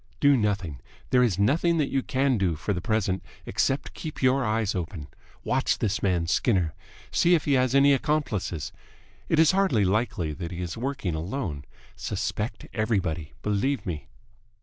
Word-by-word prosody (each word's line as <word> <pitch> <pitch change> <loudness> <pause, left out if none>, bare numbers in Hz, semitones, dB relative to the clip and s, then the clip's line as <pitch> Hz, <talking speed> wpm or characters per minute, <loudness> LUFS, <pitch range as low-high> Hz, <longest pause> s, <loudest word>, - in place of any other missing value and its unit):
"Do 145 -1 +5
nothing. 100 - -1 0.3
There 125 - +5
is 115 -8 +2
nothing 155 - +2
that 150 -3 0
you 135 - +1
can 130 -2 +1
do, 90 -4 +1
for 100 +6 -2
the 90 - -3
present, 105 -3 0 0.2
except 135 +1 0
keep 155 - -7
your 130 +1 +3
eyes 110 -2 0
open. 85 -5 -5 0.3
Watch - - +1
this 110 +2 -1
man 90 -4 +1
Skinner. 90 -2 +1 0.4
See 175 +1 +4
if 160 - -1
he 145 - +2
has 130 0 +2
any 140 +1 +6
accomplices. 135 - -1 0.6
It 160 - +2
is 160 -1 +6
hardly 185 - +2
likely 95 -6 0
that 85 +2 -5
he 85 - -6
is 90 -2 -4
working 130 - -2
alone. 80 - -4 0.3
Suspect 105 +3 -3
everybody. 95 -8 -1
Believe 105 +7 0
me 80 -6 -4
105 Hz, 165 wpm, -26 LUFS, 90-135 Hz, 0.6 s, any